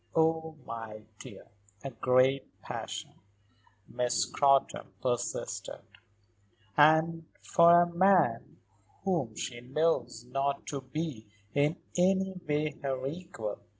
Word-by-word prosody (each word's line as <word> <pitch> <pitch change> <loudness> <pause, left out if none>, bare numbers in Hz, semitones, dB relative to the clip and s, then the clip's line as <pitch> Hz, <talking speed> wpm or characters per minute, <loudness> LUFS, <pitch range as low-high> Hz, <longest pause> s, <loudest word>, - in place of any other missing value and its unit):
"Oh, 160 0 +1
my 110 -2 -7 0.2
dear!" - - -11 0.4
"A 135 - -5
great 130 +3 +1
passion," - - -6 0.7
Miss 125 0 0
Scrotton 140 -1 +2
persisted, 120 -1 -3 0.9
"and 160 +2 +4 0.2
for 170 0 +6
a - - +1
man 170 -9 +2 0.5
whom 165 - -1
she 120 +1 -5
knows 125 -3 -1
not 135 +2 -2
to 140 -2 -4
be 135 -5 -5 0.3
in 145 +3 +2 0.2
any 190 +1 +2 0.2
way 150 0 -1
her 135 -2 -2
equal. 150 - -5
140 Hz, 105 wpm, -30 LUFS, 125-165 Hz, 0.9 s, for